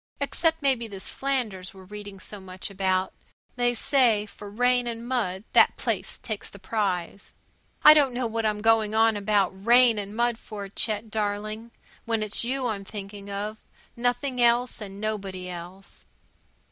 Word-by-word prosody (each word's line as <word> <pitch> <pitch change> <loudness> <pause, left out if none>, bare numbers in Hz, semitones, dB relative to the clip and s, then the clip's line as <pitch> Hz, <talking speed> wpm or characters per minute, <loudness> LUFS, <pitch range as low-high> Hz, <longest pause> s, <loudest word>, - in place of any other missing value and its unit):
Except 325 -2 0
maybe 255 -4 +2
this 195 -3 -5
Flanders 220 -9 -2
we're 190 - -12
reading 205 0 -9
so 205 +2 -6
much 185 +1 -8
about. 190 -1 0 0.4
They 245 0 +2
say 230 -4 +3
for 205 0 -11
rain 245 +3 +2
and 235 0 -5
mud 205 -7 -1
that - - +6
place - - -2
takes 215 -3 -5
the - - -13
prize. 195 -2 -2 0.5
I 300 - +11
don't 290 -4 +4
know 250 0 -1
what 225 0 -2
I'm 210 -1 0
going 220 -1 +3
on 225 0 +4
about 205 -2 +2
rain 230 +3 +5
and 205 +1 -6
mud 235 0 +1
for, 205 -2 -7
Chet 215 +2 -2
darling, 215 +1 -3 0.4
when 225 -2 0
it's 215 +1 -2
you 260 +2 0
I'm 210 -4 -2
thinking 200 0 -8
of. 205 +2 -4 0.4
Nothing 245 +2 -1
else 240 0 +3
and 200 -1 -8
nobody 195 -4 -3
else. 180 +3 -10
215 Hz, 160 wpm, -26 LUFS, 200-240 Hz, 0.5 s, I